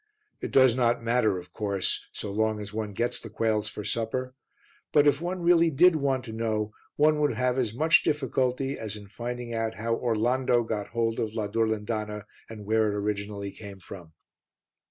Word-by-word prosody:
It - - -3
does 130 -3 +5
not 120 -2 +1
matter, 115 -4 +2
of 90 0 -10
course, 100 -3 -1
so 105 - -5
long 110 +1 0
as 105 0 -7
one 110 -1 -3
gets 120 +4 0
the 115 - -9
quails 110 -1 0
for 105 - -7
supper, 125 +3 -2 0.6
but 145 -1 +5
if 145 0 +3
one 175 +1 -3
really 170 -1 +5
did 165 +4 +5
want 135 -4 0
to 115 - -7
know, 110 -1 -1 0.2
one 150 +1 +4
would 150 -1 +2
have 125 0 +1
as 115 -3 -1
much 160 +5 +5
difficulty 135 -1 0
as 110 -2 -4
in 105 -1 -9
finding 120 +3 -5
out 115 -1 -2
how 115 +3 -1
Orlando 120 +2 +1
got 110 -2 -3
hold 115 -1 -1
of 110 -1 -2
la 110 -3 -1
Durlindana 105 -1 -2 0.2
and 110 -2 -9
where 110 +1 +2
it 105 - -2
originally 100 -1 -3
came 100 -2 -10
from. 90 -3 -11
115 Hz, 185 wpm, -27 LUFS, 105-130 Hz, 0.6 s, does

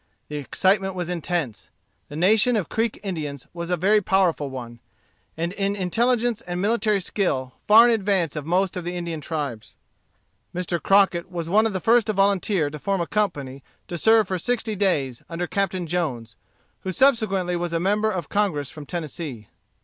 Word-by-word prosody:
The 150 - -4
excitement 190 +6 +1
was 180 -1 -3
intense. 170 - -3 0.4
The 145 - -8
nation 220 +9 +4
of 200 -8 -1
Creek 225 0 -1
Indians 150 -8 -4
was 170 0 -5
a 180 - +1
very 205 +5 +3
powerful 180 -7 +1
one, 120 -3 -8 0.6
and 170 +2 -2
in 200 0 -1
intelligence 235 +4 +1
and 175 0 -5
military 215 0 +1
skill 150 -9 -1
far 225 +3 +8
in 240 - +4
advance 195 -7 0
of 150 - -3
most 180 +4 0
of 180 - -4
the 175 +1 -4
Indian 170 -3 -4
tribes. 145 -9 -5 0.8
Mr. 175 -1 -2
Crockett 195 -3 +3
was 170 -2 -4
one 215 +4 +4
of 220 - -4
the 190 - -1
first 230 +4 +3
to 215 - +1
volunteer 195 -5 +1
to 150 - -7
form 195 +4 -1
a 170 - 0
company 145 -11 -2 0.3
to 175 - -5
serve 220 +4 +4
for 185 -1 -2
sixty 235 0 -1
days, 145 -11 0
under 170 +1 -3
Captain 190 -1 -1
Jones, 135 - -3 0.4
who 190 - -4
subsequently 195 -7 +2
was 175 0 -2
a 165 - 0
member 210 +4 +1
of 180 -8 -3
Congress 175 -10 -1
from 150 -2 -10
Tennessee. 150 - -6
180 Hz, 180 wpm, -24 LUFS, 160-205 Hz, 0.8 s, far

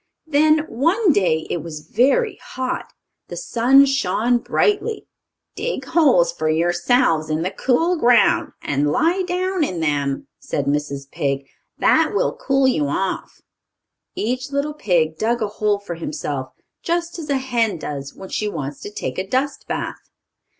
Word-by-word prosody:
Then, 310 0 +3
one 335 - +2
day, 160 -7 +1
it - - 0
was 155 -1 -8
very 280 - +2
hot. 255 0 -4 0.4
The - - -7
sun 265 +4 +4
shone 245 -2 +1
brightly. 420 - 0 0.5
"Dig - - -3
holes 245 - +4
for 155 -2 -1
yourselves 170 - +2
in 155 +1 0
the 185 - -1
cool 330 +8 +1
ground, 245 -4 +4
and 145 +1 0
lie 340 - +2
down 370 0 -1
in 185 - -2
them," 145 -3 -1
said 140 - -3
Mrs. 140 -1 -2
Pig. 140 -1 -2 0.3
"That - - +3
will - - +1
cool 270 -1 +2
you 155 - +1
off." 190 +6 -3 0.7
Each 255 +5 -2
little 280 +2 -1
pig 165 - 0
dug 235 +2 +1
a 215 - 0
hole 210 0 0
for 200 -3 -7
himself, 145 -5 -4 0.3
just 340 0 -2
as 305 -2 -7
a 280 - +2
hen 240 -6 0
does 140 -3 -6
when 190 - -10
she 210 - -1
wants 145 -6 -5
to - - -6
take - - -4
a 190 - -3
dust 270 +4 -1
bath. - - -5
230 Hz, 155 wpm, -21 LUFS, -, 0.7 s, sun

